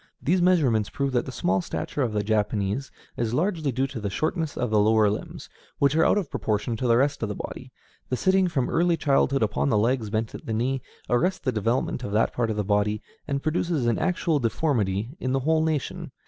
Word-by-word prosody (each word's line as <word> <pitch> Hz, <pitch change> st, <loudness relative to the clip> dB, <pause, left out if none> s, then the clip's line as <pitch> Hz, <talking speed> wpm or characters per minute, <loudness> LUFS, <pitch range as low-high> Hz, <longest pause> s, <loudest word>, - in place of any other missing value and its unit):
These 180 Hz, +4 st, +1 dB
measurements 140 Hz, -, +3 dB
prove 140 Hz, -1 st, -2 dB
that 120 Hz, 0 st, 0 dB
the -, -, -4 dB
small 95 Hz, -6 st, 0 dB
stature 80 Hz, -, -4 dB
of 120 Hz, -4 st, +1 dB
the 105 Hz, -1 st, -1 dB
Japanese 105 Hz, +3 st, 0 dB, 0.3 s
is 115 Hz, -2 st, 0 dB
due 120 Hz, -, -1 dB
largely 160 Hz, -4 st, 0 dB
to 130 Hz, 0 st, -2 dB
the 105 Hz, -2 st, -3 dB
shortness 155 Hz, -, -2 dB
of 120 Hz, -3 st, -1 dB
the 105 Hz, -, +4 dB
lower 110 Hz, 0 st, +4 dB
limbs, 105 Hz, -, -6 dB, 0.3 s
which 140 Hz, +1 st, +2 dB
are 160 Hz, -, +4 dB
out -, -, +4 dB
of 185 Hz, -8 st, -2 dB
proportion 110 Hz, +2 st, -1 dB
to 125 Hz, -, -1 dB
the 115 Hz, 0 st, +4 dB
rest 140 Hz, +3 st, +1 dB
of 110 Hz, -, -1 dB
the 105 Hz, -, -3 dB
body. -, -, -7 dB, 0.4 s
The 125 Hz, -, 0 dB
sitting 190 Hz, +3 st, +3 dB
from 135 Hz, -8 st, 0 dB
early 170 Hz, 0 st, +2 dB
childhood 135 Hz, -3 st, +2 dB
upon 70 Hz, -9 st, 0 dB
the -, -, +3 dB
legs 115 Hz, 0 st, +1 dB
bent 110 Hz, +1 st, -2 dB
at -, -, -9 dB
the 110 Hz, -, -1 dB
knee, 125 Hz, +4 st, 0 dB, 0.3 s
arrests 180 Hz, +10 st, +1 dB
the 130 Hz, -, 0 dB
development 115 Hz, +3 st, -1 dB
of 100 Hz, -, -4 dB
that 110 Hz, +2 st, +2 dB
part 120 Hz, -2 st, 0 dB
of 110 Hz, -, -1 dB
the 105 Hz, -, 0 dB
body, 105 Hz, +1 st, 0 dB, 0.2 s
and 140 Hz, -1 st, -2 dB
produces 155 Hz, -3 st, 0 dB
an 120 Hz, -1 st, +1 dB
actual 175 Hz, -4 st, +1 dB
deformity 115 Hz, -3 st, 0 dB
in 130 Hz, 0 st, -1 dB
the 135 Hz, -, +1 dB
whole 160 Hz, +3 st, +2 dB
nation. 155 Hz, -4 st, -2 dB
125 Hz, 225 wpm, -25 LUFS, 110-150 Hz, 0.4 s, the